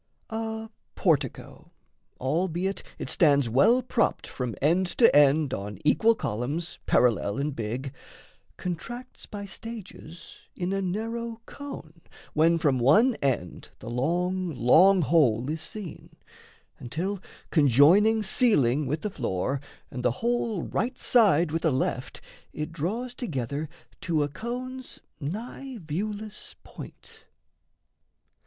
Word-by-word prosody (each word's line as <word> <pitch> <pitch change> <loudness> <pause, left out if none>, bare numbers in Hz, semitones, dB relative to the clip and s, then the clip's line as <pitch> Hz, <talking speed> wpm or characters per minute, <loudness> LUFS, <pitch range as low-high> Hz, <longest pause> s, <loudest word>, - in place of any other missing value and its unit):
A 220 0 -4 0.2
portico, 145 - -1 0.5
Albeit 175 +7 -1 0.2
it - - -5
stands 140 -6 +4
well 225 - +4
propped 235 - 0
from 125 -3 -4
end 175 +6 +2
to 230 +6 +4
end 145 -1 +5
On 100 -2 -5
equal 225 +9 +4
columns, 145 - -3
parallel 110 -2 +2
and 140 0 -2
big, 120 +4 -4 0.6
Contracts 235 +9 -6
by 205 -1 -7
stages 200 -6 -9 0.2
in 180 +1 -2
a 195 - 0
narrow 225 +4 -3
cone, 170 - -9 0.3
When 165 +2 +4
from 145 -6 +2
one 210 - +5
end 125 -11 -2
the 120 - -8
long, 175 +8 0
long 175 +10 +5
whole 130 -6 +3
is 160 0 -4
seen, 195 -1 -8 0.7
Until, 175 +10 -3 0.3
conjoining 170 - +5
ceiling 150 - +3
with 150 +4 -2
the 210 - -2
floor, 130 - -2 0.3
And 125 - -5
the 125 -1 +1
whole 235 -6 0
right 245 +6 -2
side 180 -9 +4
with 165 +1 -1
the 160 - +2
left, 130 -1 -2 0.3
it 150 +1 -4
draws 210 - -3
Together 145 - -4 0.3
to 160 -4 +1
a - - 0
cone's 250 - -6 0.2
nigh 230 - -6
viewless 205 +5 -5
point. - - -12
170 Hz, 120 wpm, -27 LUFS, 140-215 Hz, 0.7 s, end